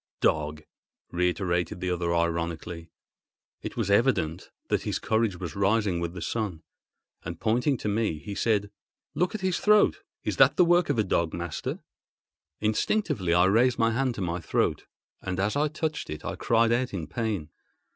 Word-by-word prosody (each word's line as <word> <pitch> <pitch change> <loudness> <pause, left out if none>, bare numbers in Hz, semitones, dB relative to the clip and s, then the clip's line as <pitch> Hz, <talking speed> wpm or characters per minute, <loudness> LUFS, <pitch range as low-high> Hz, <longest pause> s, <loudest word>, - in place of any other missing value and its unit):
"Dog!" 75 0 0 0.5
reiterated 90 0 0
the 90 -1 -1
other 85 -1 -1
ironically. 85 0 -2 0.7
It - - -6
was 100 - 0
evident 100 -7 +2 0.2
that - - +1
his - - -2
courage 110 -5 0
was 85 -3 -5
rising 100 -2 +2
with 85 0 -3
the 90 -3 -6
sun; 100 -8 -3 0.6
and, - - -6
pointing 125 +5 +1
to 110 - -5
me, 105 -5 0
he 100 +7 -7
said, 105 -1 0 0.4
"Look 180 +4 0
at 215 - -4
his 185 -2 0
throat. 210 0 +4 0.2
Is - - -2
that - - +6
the 180 - +6
work 175 -1 +3
of 145 - +1
a 110 - +3
dog, 85 -4 0
master?" 85 -1 -4 0.8
Instinctively 110 - +1
I 90 +1 +5
raised 120 +6 +3
my 115 -1 +3
hand 130 +1 0
to 100 - -5
my 85 -1 -1
throat, 85 - -1 0.3
and 90 0 -3
as 105 +5 0
I 150 +2 +2
touched 155 0 -3
it 75 - -6
I - - -3
cried 115 0 +2
out 120 -2 0
in 85 -4 -3
pain. 100 -5 -3
100 Hz, 175 wpm, -27 LUFS, 85-120 Hz, 0.8 s, that